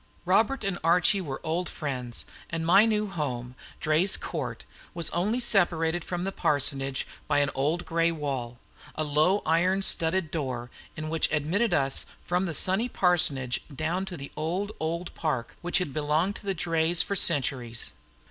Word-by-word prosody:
Robert 215 +8 +2
and 195 -3 -1
Archie 180 +4 +4
were 140 -6 -5
old 170 +3 -1
friends, 125 -5 -4 0.2
and 165 -1 -3
my 195 +6 +6
new 215 -1 +1
home, 130 -10 -4 0.3
Draye's 155 +5 +3
Court, 125 -9 -5 0.3
was 170 -2 0
only 205 +8 0
separated 175 -7 +2
from 175 0 -4
the 195 - -2
parsonage 135 -5 0 0.2
by 145 - +2
an 145 -1 +2
old 155 +6 -1
gray 165 0 +1
wall, 135 -6 -4 0.4
a 155 - -1
low 155 +7 +2
iron 180 +5 +2
studded 165 -2 +2
door 125 -6 -3 0.3
in 155 0 -4
which 160 0 +1
admitted 170 +9 +1
us 135 -4 +1 0.2
from 180 +2 0
the 165 - -2
sunny 195 +10 +4
parsonage 145 - +2
dawn 160 +6 -2
to 185 -2 -7
the 140 -1 -8
old, 185 +6 -2
old 170 +2 -3
park 135 -8 -3
which 175 0 +3
had 180 -8 -1
belonged 155 +6 0
to 200 - -12
the 195 - 0
Drayes 165 0 +2
for 200 - -3
centuries. 130 - +1
165 Hz, 165 wpm, -27 LUFS, 145-180 Hz, 0.4 s, my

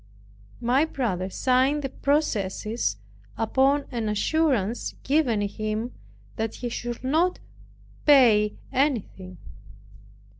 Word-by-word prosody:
My 250 +4 +3
brother 215 - -2
signed 265 +7 +2
the 270 - -2
processes, 220 - -1 0.4
upon 270 +5 +2
an 230 -4 -2
assurance 235 -1 0
given 265 -7 +2
him 215 +3 -3 0.4
that 225 0 -2
he 245 - -4
should 240 +1 -5
not 325 +7 +2 0.7
pay 225 -7 +5 0.2
anything. 225 -9 -1
240 Hz, 90 wpm, -25 LUFS, 215-275 Hz, 0.7 s, pay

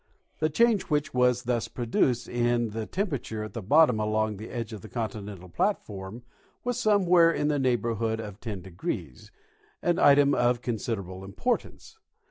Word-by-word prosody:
The 155 - +2
change 225 +5 +3
which 150 0 -1
was 125 -1 +2
thus 120 -2 -1
pro 120 - -5
duced 120 +1 +1
in 120 -1 0
the 110 0 -4
temperature 140 - -3
at 110 - -8
the 115 - -4
bottom 125 +2 +4
along 110 0 0
this 110 +3 -8
edge 115 -2 -4
of 105 - -7
the - - -11
continental 105 -5 -5
platform 105 - -3 0.4
was 245 0 -1
somewhere 180 -6 +5
in 150 -2 0
the 145 -1 +1
neighborhood 115 -3 0
of 105 -2 -7
10°, 90 - -6 0.5
an 175 0 +2
item 140 0 +6
of 120 -1 +1
considerable 100 -5 -4
importance. 240 - -3
120 Hz, 155 wpm, -27 LUFS, 110-145 Hz, 0.5 s, item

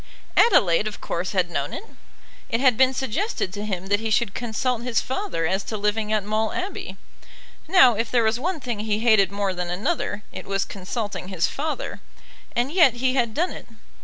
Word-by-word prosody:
Adelaide 200 - +4
of 210 - -6
course 175 +2 -3
had 180 -2 +1
known 140 -3 -2
it. - - -6 0.7
It 230 - 0
had 255 -2 +4
been 260 +2 +4
suggested 265 - -2
to 205 0 -5
him 190 -3 -3
that 205 +1 +1
he 225 0 -3
should 215 -2 +1
consult 240 +1 -1
his 240 -1 +1
father 265 - -2
as 190 +4 0
to 215 - -4
living 210 +1 0
at 215 -2 +1
Maule 215 +1 0
Abbey. 370 +2 -5 0.7
Now 320 -8 +7
if 225 +2 -2
there 240 -2 +3
was 220 +2 +1
one 345 +4 -2
thing 240 -5 -4
he 210 -1 0
hated 215 -4 +4
more 200 -1 -1
than 180 -1 -4
another, 205 - -2
it - - -8
was 195 0 0
consulting 200 -1 -5
his 185 -3 0
father; - - -4 0.5
and 245 +4 0
yet 320 -9 +5
he 255 +1 +1
had 235 -4 0
done 350 +4 +1
it. - - -9
220 Hz, 195 wpm, -24 LUFS, 195-255 Hz, 0.7 s, Now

